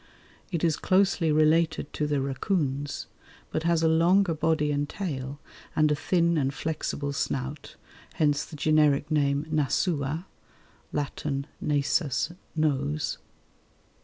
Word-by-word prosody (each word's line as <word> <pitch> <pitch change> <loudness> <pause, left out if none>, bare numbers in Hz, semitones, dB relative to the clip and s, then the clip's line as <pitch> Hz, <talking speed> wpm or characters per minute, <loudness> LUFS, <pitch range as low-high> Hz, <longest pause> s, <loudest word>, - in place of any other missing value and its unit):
It 170 -2 -2
is 165 -3 +2
closely 185 -4 +2
related 155 +2 +2
to 150 - -1
the 145 -1 +1
racoons, 140 0 -1 0.5
but 155 - -1
has 165 -1 +2
a - - +5
longer 170 +3 +4
body 155 -1 +1
and 145 0 -1
tail 140 -7 -4 0.4
and 155 -1 +4
a - - +3
thin 170 +1 +2
and 135 -1 +1
flexible 145 -1 -3
snout, 140 +1 -3 0.4
hence 145 -2 +2
the - - -10
generic 150 0 +3
name 145 -1 +2
Nasua 150 +1 0 0.7
(Latin 140 -1 -2 0.2
nasus, 145 +2 0 0.2
nose). 150 -1 0
150 Hz, 120 wpm, -27 LUFS, 140-160 Hz, 0.7 s, a